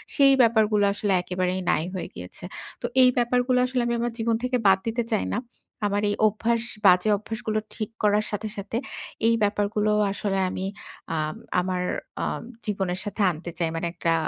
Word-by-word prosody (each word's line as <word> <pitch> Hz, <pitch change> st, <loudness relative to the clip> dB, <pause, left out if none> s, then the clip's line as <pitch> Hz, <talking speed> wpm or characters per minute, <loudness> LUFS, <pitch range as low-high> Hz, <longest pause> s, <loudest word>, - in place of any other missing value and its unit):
সেই 275 Hz, -2 st, +6 dB
ব্যাপারগুলো 220 Hz, -3 st, +4 dB
আসলে 205 Hz, -1 st, 0 dB
একেবারেই 180 Hz, +1 st, -1 dB
নাই 160 Hz, -, +1 dB
হয়ে 185 Hz, -, -4 dB
গিয়েছে। 90 Hz, -, -9 dB, 0.4 s
তো -, -, -3 dB, 0.2 s
এই 255 Hz, -, +7 dB
ব্যাপারগুলো 250 Hz, +1 st, +2 dB
আসলে 255 Hz, 0 st, 0 dB
আমি 235 Hz, -, 0 dB
আমার 240 Hz, +1 st, -1 dB
জীবন 225 Hz, 0 st, +1 dB
থেকে 250 Hz, 0 st, +1 dB
বাদ 190 Hz, 0 st, +6 dB
দিতে 235 Hz, +1 st, 0 dB
চাই 215 Hz, -, +1 dB
না। 210 Hz, -, 0 dB, 0.5 s
আমার 205 Hz, 0 st, 0 dB
এই 205 Hz, -, 0 dB
অভ্যাস, 230 Hz, +2 st, 0 dB, 0.3 s
বাজে 180 Hz, +4 st, +5 dB
অভ্যাসগুলো 215 Hz, +1 st, -3 dB, 0.2 s
ঠিক 215 Hz, -, -3 dB
করার 210 Hz, 0 st, +3 dB
সাথে, 210 Hz, +1 st, -3 dB
সাথে 200 Hz, +3 st, -3 dB, 0.5 s
এই 230 Hz, -, +4 dB
ব্যাপারগুলো 210 Hz, +1 st, +1 dB, 0.2 s
আসলে 195 Hz, -1 st, -1 dB
আমি 185 Hz, +1 st, -4 dB, 0.5 s
আম 155 Hz, 0 st, -2 dB, 0.3 s
আমার 180 Hz, 0 st, -1 dB, 0.3 s
অ্যা -, -, -1 dB, 0.4 s
জীবনের 190 Hz, -3 st, -1 dB
সাথে 205 Hz, +1 st, -3 dB
আনতে 170 Hz, +1 st, -7 dB
চাই। 165 Hz, -2 st, +1 dB
মানে 165 Hz, +1 st, -1 dB
একটা 165 Hz, -2 st, 0 dB
210 Hz, 170 wpm, -25 LUFS, 185-230 Hz, 0.5 s, এই